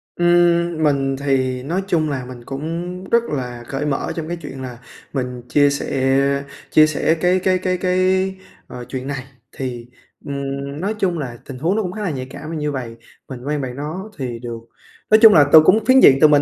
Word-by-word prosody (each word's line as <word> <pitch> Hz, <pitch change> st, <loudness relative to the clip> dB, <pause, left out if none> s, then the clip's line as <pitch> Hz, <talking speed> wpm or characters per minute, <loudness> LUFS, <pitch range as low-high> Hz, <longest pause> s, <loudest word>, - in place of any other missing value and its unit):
Ưm, 175 Hz, -1 st, +3 dB
mình 135 Hz, -2 st, +1 dB
thì 130 Hz, -2 st, 0 dB
nói 175 Hz, +8 st, -2 dB
chung 155 Hz, -4 st, +1 dB
là 130 Hz, -3 st, -3 dB
mình 125 Hz, -1 st, -10 dB
cũng 170 Hz, +6 st, -5 dB
rất 235 Hz, 0 st, +4 dB
là 125 Hz, -, -5 dB
cởi 135 Hz, +2 st, -3 dB
mở 145 Hz, -2 st, -2 dB
trong 160 Hz, -2 st, -4 dB
cái 175 Hz, +1 st, -4 dB
chuyện 135 Hz, -3 st, -8 dB
là 125 Hz, -2 st, -7 dB, 0.3 s
mình 125 Hz, -3 st, -3 dB
chia 145 Hz, -1 st, +4 dB
sẻ 140 Hz, 0 st, 0 dB, 0.3 s
chia 155 Hz, 0 st, +6 dB
sẻ 155 Hz, +1 st, +1 dB
cái 180 Hz, +1 st, +3 dB
cái 185 Hz, 0 st, +2 dB
cái 185 Hz, 0 st, -1 dB
cái, 185 Hz, +1 st, +1 dB, 0.3 s
ờ, 125 Hz, -1 st, -8 dB
chuyện 130 Hz, 0 st, -5 dB
này. 140 Hz, -2 st, -4 dB, 0.3 s
Thì, 125 Hz, -3 st, -5 dB, 0.4 s
ừm, 140 Hz, 0 st, -4 dB
nói 205 Hz, +3 st, -1 dB
chung 180 Hz, -4 st, 0 dB
là 125 Hz, -5 st, -5 dB
tình 135 Hz, -, -8 dB
huống 170 Hz, +7 st, +1 dB
nó 220 Hz, -, +1 dB
cũng 180 Hz, -, -3 dB
khá 215 Hz, -, -7 dB
là 200 Hz, -, -1 dB
nhạy 130 Hz, -3 st, -5 dB
cảm 155 Hz, +4 st, -7 dB
như 150 Hz, -1 st, -2 dB
vầy, 125 Hz, -4 st, -5 dB, 0.3 s
mình 125 Hz, -2 st, -8 dB
quen 150 Hz, -1 st, -1 dB
bạn 125 Hz, -2 st, -5 dB
đó 160 Hz, +9 st, -6 dB
thì 125 Hz, -4 st, -4 dB
được 115 Hz, -1 st, -6 dB, 0.5 s
nói 215 Hz, -, +7 dB
chung 225 Hz, -2 st, +9 dB
là 150 Hz, -3 st, +7 dB
từ 160 Hz, -, +11 dB
cũng 210 Hz, +8 st, +3 dB
phiến 260 Hz, +1 st, +6 dB
diện 135 Hz, -, +7 dB
từ 155 Hz, -, +9 dB
mình 145 Hz, -1 st, +4 dB
145 Hz, 210 wpm, -20 LUFS, 130-175 Hz, 0.5 s, từ